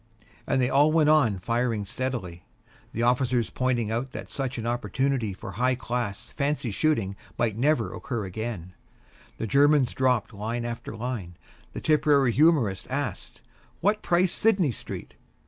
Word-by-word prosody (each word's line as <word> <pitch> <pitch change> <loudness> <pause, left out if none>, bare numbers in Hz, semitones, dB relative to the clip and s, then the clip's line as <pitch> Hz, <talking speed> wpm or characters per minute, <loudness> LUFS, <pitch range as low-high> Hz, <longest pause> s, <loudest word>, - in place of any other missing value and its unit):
And - - +2
they 125 - +3
all 145 +3 +5
went 155 -2 +4
on 120 -10 +4
firing 115 +2 -1
steadily. 100 -6 -4 0.5
The 115 - -2
officer 125 0 +2
pointed 120 -4 0
out 125 +4 -2
that - - -7
such 135 -2 -3
an 115 - -4
opportunity 120 -1 0
for 95 - -8
high 125 +2 +1
class 120 -5 -4
fancy 140 -4 -1
shooting 105 -6 0 0.2
might 115 -3 0
never 145 +7 +1
occur 115 -5 -4
again; 95 -2 -5 0.6
the - - -3
Tipperary 125 - 0
humorist 135 - +3
asked, 130 -7 -4 0.4
"What 210 +3 +2
price 175 +1 +2
Sidney 190 - +2
Street?" - - -8
125 Hz, 125 wpm, -26 LUFS, 110-140 Hz, 0.6 s, all